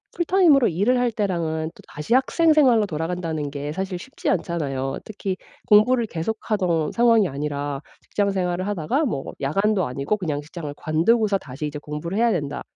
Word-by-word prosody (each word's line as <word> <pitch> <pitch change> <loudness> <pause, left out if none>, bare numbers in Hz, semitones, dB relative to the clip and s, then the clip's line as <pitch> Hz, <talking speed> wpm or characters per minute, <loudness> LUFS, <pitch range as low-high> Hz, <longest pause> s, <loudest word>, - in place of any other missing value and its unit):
풀타임으로 345 -7 +4
일을 205 +10 +2
할 245 -1 +1
때랑은 165 -7 -2
또다시 150 +9 -5
학생 315 +5 +3
생활로 250 -8 +5
돌아간다는 160 -2 -3
게 145 +1 -4
사실 190 +2 -3
쉽지 260 +10 -5
않잖아요. 140 -7 -1
특히 195 -3 -4 0.3
공부를 230 +3 +5
계속하던 175 -3 -1
상황이 230 -4 +4
아니라 145 0 -3 0.2
직장 205 -1 -1
생활을 185 0 -1
하다가 205 - 0
뭐 140 - -3
야간도 195 +6 +1
아니고 140 +11 -1
그냥 155 -6 -2
직장을 150 0 -7
관두고서 200 +7 +2
다시 140 -3 -7
이제 150 0 -6
공부를 150 +6 -5
해야 235 0 +3
된다. 145 -6 -2
180 Hz, 390 characters per minute, -23 LUFS, 150-220 Hz, 0.3 s, 생활로